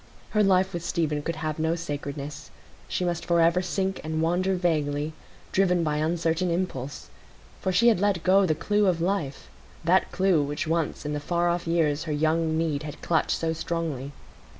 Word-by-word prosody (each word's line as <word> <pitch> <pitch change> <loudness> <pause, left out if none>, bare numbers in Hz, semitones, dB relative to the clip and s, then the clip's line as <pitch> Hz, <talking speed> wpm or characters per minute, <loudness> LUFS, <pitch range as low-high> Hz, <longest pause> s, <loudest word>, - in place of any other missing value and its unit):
Her 210 - +3
life 190 -1 +3
with 170 -1 -4
Stephen 155 -4 -1
could 165 +3 -3
have 155 -1 -3
no 160 +1 +1
sacredness; 145 -3 -5 0.4
she 180 - -1
must 175 -1 -1
forever 170 +1 +3
sink 190 +1 -2
and 160 0 -2
wander 180 +4 +1
vaguely, 155 -4 0 0.4
driven 180 -3 +2
by 150 -1 0
uncertain 165 +2 0
impulse; 170 -6 -3 0.5
for 190 - 0
she 235 +6 +5
had 220 - +3
let 200 -4 +1
go 190 +1 +5
the 155 - +2
clue 205 +5 +1
of 175 -3 +2
life,—that 170 0 -1
clue 185 -4 +3
which 145 +3 -2
once 160 -2 -1
in 150 - -2
the 150 - -1
far 175 +3 0
off 175 0 -1
years 160 -2 +1
her 155 - -3
young 160 +1 +1
need 160 -3 0
had 150 -1 -7
clutched 160 -2 +1
so 165 0 -1
strongly. 160 -5 -3
165 Hz, 175 wpm, -26 LUFS, 155-180 Hz, 0.5 s, she